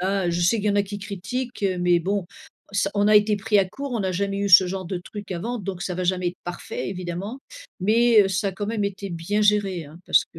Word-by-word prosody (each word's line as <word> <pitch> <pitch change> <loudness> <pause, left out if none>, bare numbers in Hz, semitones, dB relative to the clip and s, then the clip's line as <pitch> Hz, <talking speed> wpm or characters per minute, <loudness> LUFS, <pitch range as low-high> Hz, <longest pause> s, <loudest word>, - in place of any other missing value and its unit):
hein. 190 -1 0
Je 170 0 0
sais 175 +6 +3
qu'il 215 - -3
y - - +4
en - - 0
a 205 - +4
qui 205 +1 -6
critiquent, 205 +5 -5
heu, 185 -2 +1
mais 175 -1 +3
bon 195 +1 -1 0.5
ça 200 0 +1
on 205 0 +2
a 215 - +5
été 210 0 +5
pris 210 +1 +2
à 195 - +3
court, 275 +5 -6
on 230 -4 -1
a 190 - 0
jamais 195 +2 -1
eu 200 0 0
ce 185 0 +8
genre 185 0 -4
de 185 +1 -3
truc 200 +3 -9
avant, 225 +8 -3
donc 190 -3 -5
ça 180 - -3
va 185 - -3
jamais 180 0 0
être 180 - -9
parfait 175 0 -5
évidemment, 185 +5 -5 0.4
mais, 225 +3 +5
heu, 195 - 0
ça 190 +1 0
a - - -4
quand 205 +2 -4
même 215 -1 -1
été 200 0 -4
bien 175 +5 -1
géré, 200 -5 +2
hein. 150 +3 -13
Parce - - +4
que 165 - -13
195 Hz, 270 wpm, -24 LUFS, 180-210 Hz, 0.5 s, ce